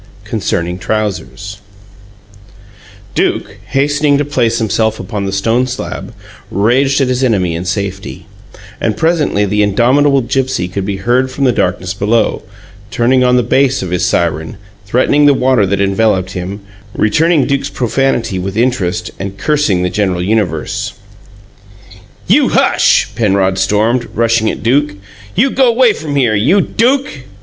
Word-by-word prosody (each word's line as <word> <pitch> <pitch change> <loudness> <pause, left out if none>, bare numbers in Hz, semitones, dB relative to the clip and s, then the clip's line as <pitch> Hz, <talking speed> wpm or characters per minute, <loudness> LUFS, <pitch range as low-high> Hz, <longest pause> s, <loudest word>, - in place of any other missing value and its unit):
CONCERNING 90 +2 -3
TROUSERS 105 -1 -4 1.5
Duke, 100 - -1
hastening 145 +3 +1
to 145 - -1
place 120 -5 0
himself 110 0 0
upon 100 +1 -4
the - - -2
stone 115 +6 0
slab, 125 - -6 0.3
raged 130 +8 +2
at 135 - +2
his 125 +1 -1
enemy 95 -9 +1
in 85 +2 -4
safety; 100 0 -4 0.6
and 110 -2 -1
presently 160 -11 +1
the 105 +1 0
indomitable 130 +7 +3
Gipsy 130 -7 -1
could 95 +1 -4
be 100 -1 -2
heard 125 +6 +1
from 135 +2 -4
the 130 - +4
darkness 90 -3 -1
below, 105 +3 0 0.5
turning 125 +3 +2
on 125 0 +3
the 125 - +3
bass 135 0 +1
of 90 - -5
his 90 - -1
siren, 80 +1 -1 0.3
threatening 140 +6 +3
the 140 - +5
water 125 -6 +2
that 100 +1 -1
enveloped 100 -1 +1
him, 95 +3 -6 0.4
returning 155 +8 +2
Duke's 140 0 -1
profanity 120 -5 -1
with 95 +3 -4
interest, 110 -8 -1
and 100 0 -6
cursing 140 -10 +1
the 90 - -1
general 95 -3 -1
universe. 90 -6 -1 1.3
"You - - +3
hush!" - - +3
Penrod 95 -3 +1
stormed, 110 +5 +1
rushing 115 -1 +2
at - - -5
Duke. 140 +3 +1 0.4
"You 255 +7 +2
go 260 -2 +3
'way 235 -1 +3
from 150 -2 -5
here! 125 -6 +2
You 125 - +3
DUKE!" 240 - 0
115 Hz, 145 wpm, -14 LUFS, 100-135 Hz, 1.5 s, the